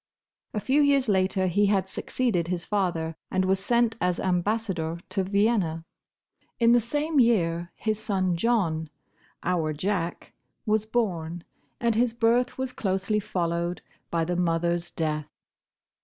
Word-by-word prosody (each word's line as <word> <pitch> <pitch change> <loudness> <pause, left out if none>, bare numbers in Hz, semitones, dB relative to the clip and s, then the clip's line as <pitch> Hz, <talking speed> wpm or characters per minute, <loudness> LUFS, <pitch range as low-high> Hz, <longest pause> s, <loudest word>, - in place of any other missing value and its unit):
A - - +1
few 265 +8 +2
years 280 -3 +3
later 190 -1 +2
he 205 +3 +3
had 195 -2 +2
succeeded 190 -4 -1
his 175 -1 -3
father, 170 -6 -1
and 185 0 +1
was 190 0 +2
sent 235 +2 +1
as 180 0 +1
Ambassador 180 -3 -1
to 195 - 0
Vienna. 195 -5 +1 0.7
In 230 -1 +5
the 240 0 +5
same 295 +6 0
year 175 -8 +2
his 215 -1 -1
son 190 -5 0
John—our 165 -4 -2
Jack—was 200 +5 -3
born, 175 -8 -1 0.4
and 235 -1 +2
his 235 +1 +1
birth 240 +2 +2
was 260 -1 -3
closely 195 +1 0
followed 170 -2 -2 0.3
by 165 -1 0
the 175 +1 -1
mother's 170 0 0
death. 155 -2 -2
190 Hz, 130 wpm, -26 LUFS, 170-225 Hz, 0.7 s, In